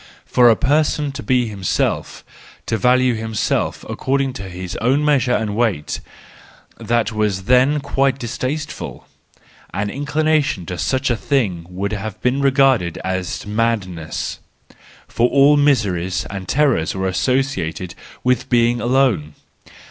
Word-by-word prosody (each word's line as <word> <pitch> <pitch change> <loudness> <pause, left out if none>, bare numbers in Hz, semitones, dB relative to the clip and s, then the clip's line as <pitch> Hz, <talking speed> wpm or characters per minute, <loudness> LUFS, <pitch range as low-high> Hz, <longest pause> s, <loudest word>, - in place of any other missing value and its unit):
For 120 -1 +5
a 115 - +5
person 150 +2 +1
to 135 +1 -7
be 125 -3 +1
himself, 100 -4 -2 0.4
to 115 - -1
value 125 +3 +3
himself 110 -1 -2
according 135 0 -1
to 95 -4 -7
his 90 0 -6
own 135 +6 +1
measure 140 -4 +2
and 105 -2 -2
weight—that 115 +2 -3
was 105 -3 -1
then 130 +6 +3
quite 135 -1 +1
distaste¬ 130 +5 -3
ful. - - -8 0.7
The 100 +2 -2
inclination 145 - 0
to 90 +1 -6
such 130 -1 0
a - - +2
thing 100 - -1
would 95 +3 -3
have 105 0 -5
been 125 +3 +1
regarded 135 - +3
as 95 0 -3
madness; 105 -7 -2 0.7
for 120 +1 +1
all 140 +1 +5
miseries 100 -12 +1
and 95 -2 -6
terrors 135 - +1
were 95 0 -1
associated 95 -5 -1 0.3
with 125 0 +1
being 120 0 +2
alone. 120 - +1
120 Hz, 130 wpm, -19 LUFS, 95-135 Hz, 0.7 s, For